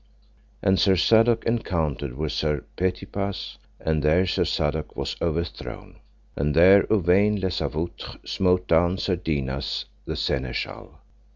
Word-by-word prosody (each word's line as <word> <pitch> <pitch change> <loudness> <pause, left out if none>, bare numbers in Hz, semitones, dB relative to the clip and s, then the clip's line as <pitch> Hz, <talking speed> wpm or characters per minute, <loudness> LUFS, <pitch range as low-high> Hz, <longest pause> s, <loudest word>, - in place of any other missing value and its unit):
And 95 -1 +3
Sir 95 -1 +4
Sadok 115 +4 +4
encountered 80 - -1
with 75 0 -2
Sir 75 -2 -1
Petipase, 95 +2 -3 0.2
and 80 -1 0
there 80 +5 +3
Sir 90 - 0
Sadok 75 +1 -2
was - - -3
overthrown. 85 0 -4 0.4
And 75 +1 -1
there 95 +4 +6
Uwaine 100 +1 +3
les 95 -2 -1
Avoutres 80 +4 -4
smote 90 -1 +1
down 85 +3 +3
Sir 95 0 0
Dinas, 70 -5 -3 0.2
the - - -4
Seneschal. 65 -1 -3
85 Hz, 125 wpm, -24 LUFS, 75-95 Hz, 0.4 s, there